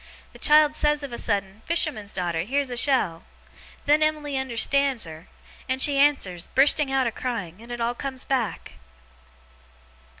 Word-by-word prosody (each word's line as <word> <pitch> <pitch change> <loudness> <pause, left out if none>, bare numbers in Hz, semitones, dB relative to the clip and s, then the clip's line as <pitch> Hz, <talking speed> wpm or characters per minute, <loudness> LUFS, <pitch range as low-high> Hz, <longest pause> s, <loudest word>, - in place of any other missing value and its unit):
The - - -15
child 300 0 +5
says 295 -1 +1
of 275 -4 -7
a - - -4
sudden, 200 -1 -2
"Fisherman's 300 -11 0
daughter, 175 -3 -3
here's 265 +7 -2
a - - -3
shell!" 235 - +2 0.6
Then 295 +2 +3
Em'ly 305 -2 -1
unnerstands 265 0 +1
her; 160 0 -11 0.4
and 260 0 -1
she 280 0 +3
answers, 230 -12 +1
bursting 280 +1 +4
out 270 -1 +1
a 235 - -1
crying; 215 -7 -5
and 235 +1 -12
it 240 - -5
all 235 +1 -1
comes 265 +1 -5
back! 230 - -3
260 Hz, 160 wpm, -24 LUFS, 210-285 Hz, 0.6 s, child